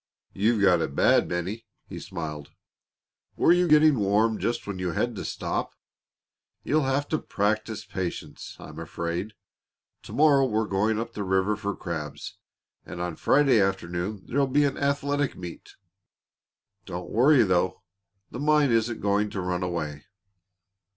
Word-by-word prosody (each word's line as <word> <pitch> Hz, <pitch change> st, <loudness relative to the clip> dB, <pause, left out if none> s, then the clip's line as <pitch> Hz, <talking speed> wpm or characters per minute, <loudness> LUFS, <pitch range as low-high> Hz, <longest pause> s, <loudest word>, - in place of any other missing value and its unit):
"You've 105 Hz, +1 st, +1 dB
got 90 Hz, -3 st, +5 dB
it 70 Hz, -, -3 dB
bad, -, -, +4 dB
Bennie," 90 Hz, +6 st, -4 dB, 0.2 s
he -, -, -7 dB
smiled. 80 Hz, -6 st, -6 dB, 0.9 s
"Were -, -, +4 dB
you 180 Hz, 0 st, +3 dB
getting 150 Hz, -4 st, +5 dB
warm 105 Hz, +2 st, +2 dB
just 120 Hz, 0 st, -2 dB
when 100 Hz, -2 st, -5 dB
you 90 Hz, -2 st, -2 dB
had 120 Hz, +7 st, -1 dB
to -, -, -5 dB
stop? -, -, -3 dB, 0.9 s
You'll 155 Hz, -1 st, +1 dB
have 135 Hz, +2 st, 0 dB
to 155 Hz, -, 0 dB
practise 105 Hz, +1 st, -2 dB
patience, 95 Hz, -3 st, -6 dB
I'm 75 Hz, +1 st, -10 dB
afraid. 85 Hz, +5 st, -4 dB, 0.7 s
To -, -, -12 dB
morrow 140 Hz, -3 st, +4 dB
we're 110 Hz, -2 st, 0 dB
going 105 Hz, +2 st, 0 dB
up 115 Hz, 0 st, -5 dB
the 105 Hz, -, -5 dB
river 95 Hz, +2 st, +1 dB
for 100 Hz, -2 st, -4 dB
crabs, 80 Hz, -5 st, -6 dB, 0.4 s
and 85 Hz, -, -9 dB
on 90 Hz, -2 st, -3 dB
Friday 135 Hz, -, +4 dB
afternoon 95 Hz, +1 st, -2 dB
there'll 140 Hz, +2 st, +1 dB
be 145 Hz, +3 st, +3 dB
an 140 Hz, -, 0 dB
athletic 140 Hz, 0 st, 0 dB
meet. 90 Hz, -2 st, -9 dB, 1.1 s
Don't 90 Hz, 0 st, -6 dB
worry, 130 Hz, +5 st, +5 dB
though. 95 Hz, -1 st, 0 dB, 0.5 s
The 125 Hz, -, -6 dB
mine 150 Hz, -2 st, +3 dB
isn't 115 Hz, 0 st, 0 dB
going 105 Hz, +1 st, +1 dB
to 100 Hz, -, -5 dB
run 90 Hz, 0 st, -2 dB
away." 80 Hz, -5 st, -4 dB
105 Hz, 150 wpm, -26 LUFS, 90-130 Hz, 1.1 s, got